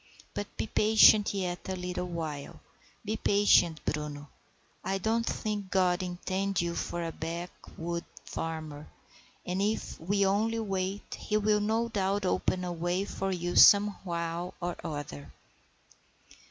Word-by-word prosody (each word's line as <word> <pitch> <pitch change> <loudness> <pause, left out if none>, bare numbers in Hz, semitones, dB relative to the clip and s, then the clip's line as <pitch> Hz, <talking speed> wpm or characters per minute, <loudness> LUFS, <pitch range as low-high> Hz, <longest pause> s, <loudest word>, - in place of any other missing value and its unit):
But 205 - -6
be - - -1
patient 215 -1 +6
yet 185 -2 -3
a 190 - -1
little 180 0 -3
while; 160 -5 -5 0.5
be 215 +2 -1
patient, 200 -6 +3
Bruno. 150 -1 -3 0.5
I 195 - -1
don't 225 +4 0
think 210 -3 -2
God 185 -1 +2
intended 185 +1 -1
you 170 0 -2
for 170 0 -3
a 165 - -3
backwoods 170 +1 -6 0.2
farmer, 155 -2 -5 0.6
and 180 +2 -1
if 210 +2 -1
we 200 +4 +1
only 215 +4 +1
wait 195 -2 -3
he 210 - 0
will 210 0 +2
no 220 +3 +1
doubt 200 -2 0
open 185 0 0
a 175 -1 -3
way 175 +3 -1
for 195 -1 -3
you 175 -1 -2
somehow 175 -4 +4
or 175 -1 -3
other." 145 - -6
185 Hz, 135 wpm, -30 LUFS, 170-205 Hz, 0.6 s, patient